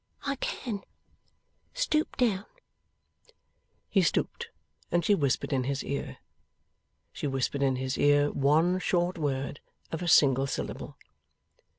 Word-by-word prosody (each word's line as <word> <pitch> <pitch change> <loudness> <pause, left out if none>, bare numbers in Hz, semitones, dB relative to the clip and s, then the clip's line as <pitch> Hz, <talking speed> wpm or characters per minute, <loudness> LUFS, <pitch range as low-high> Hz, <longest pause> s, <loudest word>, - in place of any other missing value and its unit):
'I 275 -1 -1
can. 220 -5 -3 0.9
Stoop 320 -12 0
down.' 215 -6 +1 1.4
He 195 - +3
stooped, 165 - 0 0.4
and 175 -1 +2
she 205 - +4
whispered 140 -5 0
in 130 -2 +1
his 140 +1 -2
ear. 140 - -4 1.0
She - - -3
whispered 135 +1 -1
in 135 -1 +2
his 130 0 -3
ear 145 0 +4
one 160 +6 +3
short 175 0 0
word 140 -1 -2 0.3
of 160 - -3
a 175 - -3
single 135 -5 +5
syllable. - - -5
150 Hz, 120 wpm, -29 LUFS, 135-185 Hz, 1.4 s, single